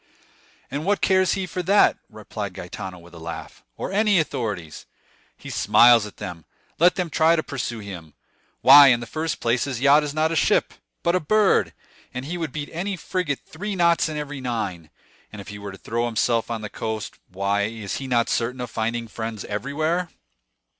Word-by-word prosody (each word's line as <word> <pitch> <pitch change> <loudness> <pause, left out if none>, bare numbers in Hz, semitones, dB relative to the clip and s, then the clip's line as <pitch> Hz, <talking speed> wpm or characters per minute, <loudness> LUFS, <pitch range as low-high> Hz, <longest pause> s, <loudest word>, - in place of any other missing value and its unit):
"And 145 +2 -3
what 205 +3 +1
cares 190 -1 +3
he 190 -1 -2
for 180 0 -4
that," 200 +4 +4
replied 105 -3 -7
Gaetano 90 +1 -7
with 85 0 -16
a 85 - -11
laugh, 80 0 -8
"or - - -4
any 210 0 +3
authorities? 110 - -3 0.5
He - - -9
smiles 120 -3 +5
at 105 - -14
them. 90 -6 -7 0.3
Let 175 +2 +5
them 180 -4 -2
try 160 +2 +4
to 155 - -1
pursue 130 -4 -4
him! 90 -7 -9 0.5
Why, 140 +2 +10
in 125 -3 +5
the 120 - -6
first 155 +5 -3
place, 120 +2 +1
his 130 -4 -4
yacht 145 +3 +6
is 150 -1 -3
not 155 +2 +1
a - - -1
ship, - - +2 0.3
but 170 - +2
a 185 - +3
bird, 210 +5 +3 0.4
and 125 +1 -4
he 165 +5 -4
would 165 -5 -3
beat 145 0 -5
any 190 +4 -2
frigate 180 -6 -3
three 200 +5 -5
knots 170 -2 +3
in 155 - -4
every 145 -2 -5
nine; 100 -10 -4 0.4
and 110 - -9
if 100 - -9
he 105 0 -8
were 100 -1 -7
to 95 - -11
throw 115 +4 -2
himself 115 0 0
on 115 -2 -3
the 105 - -6
coast, 110 -1 -5
why, 100 +2 0
is 105 -2 -5
he 135 - -6
not 120 -2 +2
certain 125 +2 -1
of 125 - -5
finding 115 +1 -2
friends 110 -2 -6
everywhere?" 155 - -2
125 Hz, 195 wpm, -23 LUFS, 105-160 Hz, 0.5 s, Why